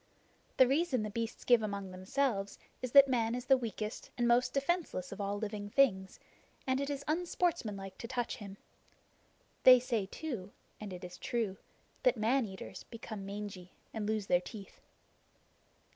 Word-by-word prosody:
The 260 - +7
reason 275 -3 +1
the 215 - -4
beasts 230 +1 -4
give 240 -2 +5
among 200 -3 -4
themselves 195 +2 -1 0.2
is 255 -2 -3
that 280 -1 +10
Man 235 -3 +1
is 250 +1 -5
the 265 +1 +6
weakest 225 -3 -4
and 240 -1 +2
most 245 +1 +4
defenseless 280 - -1
of 195 - -5
all 200 0 -1
living 205 -1 -4
things, 195 -7 +2 0.5
and 260 +1 +1
it 280 - -2
is 280 -1 -3
unsportsmanlike 310 - -1
to 230 - -5
touch 245 0 -2
him. 200 -4 -9 1.0
They 255 -1 +9
say 235 -5 -1
too 210 -7 -6 0.3
and 210 -2 -7
it 180 0 -8
is 180 0 -8
true 220 -5 -1 0.4
that 250 -1 +3
man 230 +3 +2
eaters 190 -1 -8
become 220 -4 -7
mangy, 200 -3 -7 0.2
and 215 -2 -3
lose 215 -2 0
their 180 -2 +3
teeth. 195 +2 -10
225 Hz, 160 wpm, -33 LUFS, 200-255 Hz, 1.0 s, that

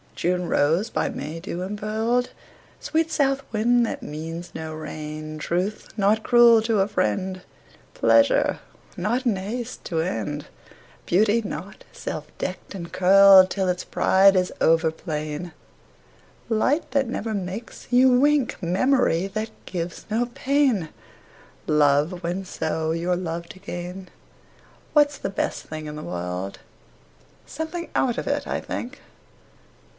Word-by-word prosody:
June 180 0 0
rose, 165 +10 +2
by - - 0
May 155 +4 -6
dew 175 0 -5
impearled; 220 +5 -1 0.5
Sweet 325 0 0
south 275 -2 +1
wind, 235 +2 +3
that - - -5
means 165 +3 -6
no 160 0 -6
rain; 155 0 -6
Truth, 180 +7 -2
not 210 +2 +3
cruel 235 -1 +6
to 225 -2 +1
a 195 - +3
friend; 185 - -1 0.5
Pleasure, 115 0 +3 0.4
not 235 +8 -1
in 230 -4 +2
haste 225 +6 -5
to 165 - -2
end; 150 -3 -2 0.6
Beauty, 210 +5 +3
not 195 -1 -7
self - - -6
decked 185 +2 -5
and 170 -3 -7
curled 190 0 +7
Till 190 -2 -1
its 180 0 -1
pride 195 +1 +4
is 185 0 +1
over 165 0 +4
plain; 155 0 -5 1.0
Light, 255 +8 +1
that 270 -1 +1
never 225 -2 -3
makes 200 +3 -6
you 250 0 +5
wink; 290 -2 +2
Memory, 185 0 +2
that 215 +3 -4 0.2
gives 170 -1 -5
no 235 +3 0
pain; 265 - +1 0.8
Love, 150 +4 +2
when, 180 +3 -2
so, 160 -2 -2
you're 170 +2 0
loved 170 -2 -5
again. 180 0 -7 0.8
What's 290 -1 +4
the - - -3
best 195 - -2
thing 155 -1 -7
in 150 - -6
the 150 - -7
world? 90 +2 -4 0.9
Something 330 +3 -5
out 245 -2 +1
of - - -5
it, - - -1
I - - -1
think. 255 +4 -6
190 Hz, 135 wpm, -24 LUFS, 165-230 Hz, 1.0 s, curled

